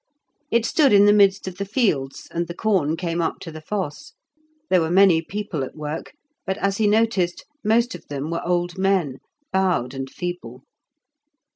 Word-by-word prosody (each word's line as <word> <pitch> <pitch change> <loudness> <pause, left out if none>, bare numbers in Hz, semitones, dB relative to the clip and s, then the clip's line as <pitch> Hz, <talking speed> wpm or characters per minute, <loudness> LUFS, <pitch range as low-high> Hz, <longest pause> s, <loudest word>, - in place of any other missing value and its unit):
It 235 -3 +2
stood 275 0 +3
in 200 0 +7
the 205 - +6
midst 200 -2 +4
of 185 -1 -6
the - - 0
fields, 195 - -1
and 170 0 -2
the 170 - -7
corn 180 -8 +1
came 170 -1 -2
up 165 - -1
to 165 - -7
the 155 0 -9
fosse; 195 - -5 0.5
there 185 - +3
were 160 - -1
many 180 -2 +5
people 190 -4 -4
at 130 - -7
work, 155 +1 -6 0.3
but, 190 0 -2
as 195 0 0
he 220 - +2
noticed, 210 -5 +1 0.2
most 235 +3 +2
of 165 - -11
them 145 +2 -4
were 170 - -2
old 175 +1 -1
men, 185 -9 +1 0.3
bowed 180 -10 +1
and 135 0 -5
feeble. 135 -8 -6
180 Hz, 180 wpm, -22 LUFS, 160-205 Hz, 0.5 s, in